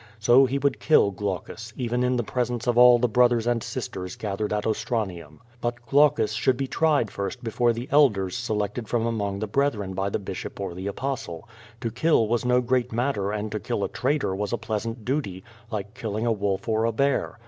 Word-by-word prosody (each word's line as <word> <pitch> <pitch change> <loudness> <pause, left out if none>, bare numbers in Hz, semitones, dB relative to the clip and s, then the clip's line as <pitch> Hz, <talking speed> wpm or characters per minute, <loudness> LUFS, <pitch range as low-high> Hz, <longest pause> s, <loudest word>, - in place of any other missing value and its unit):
So 120 +4 +5
he 135 +2 -1
would 140 -1 0
kill 155 -10 +4
Glaucus, 105 +3 -5
even 125 0 -1
in 125 0 +1
the 120 - 0
presence 120 0 -2
of 120 -2 +1
all 125 0 +8
the 125 +1 +2
brothers 120 0 +3
and 120 -1 +1
sisters 95 -9 -5
gathered 105 0 -3
at 105 -1 -1
Ostra 110 0 0
nium. 85 -5 -10 0.2
But 120 0 -3
Glaucus 140 -6 +3
should 125 +3 +1
be 135 - -1
tried 145 -5 +1
first 110 +6 -5
before 120 +1 +1
the 120 +2 -5
elders 110 -10 +3
se 120 -2 -3
lected 105 +2 -3
from 115 0 0
among 105 -4 -2
the 110 - -2
brethren 105 -6 0
by 95 +1 -1
the - - -1
bishop 95 -2 -7
or 95 -3 -4
the 95 +3 -6
Apostle. 100 -7 -4 0.3
To 115 - -2
kill 120 -1 +2
was 120 +2 0
no 125 0 +3
great 125 0 0
matter 115 -4 -1
and 105 0 -3
to 105 - -2
kill - - -2
a - - -1
traitor 140 -6 0
was 105 +1 -3
a 120 - 0
pleasant 115 +1 -4
duty, 125 -9 -2 0.3
like 105 -2 -5
killing 110 -3 -3
a 120 - +2
wolf 100 -2 -1
or 110 0 +1
a 115 - +1
bear. 140 +5 0
115 Hz, 215 wpm, -25 LUFS, 105-125 Hz, 0.3 s, all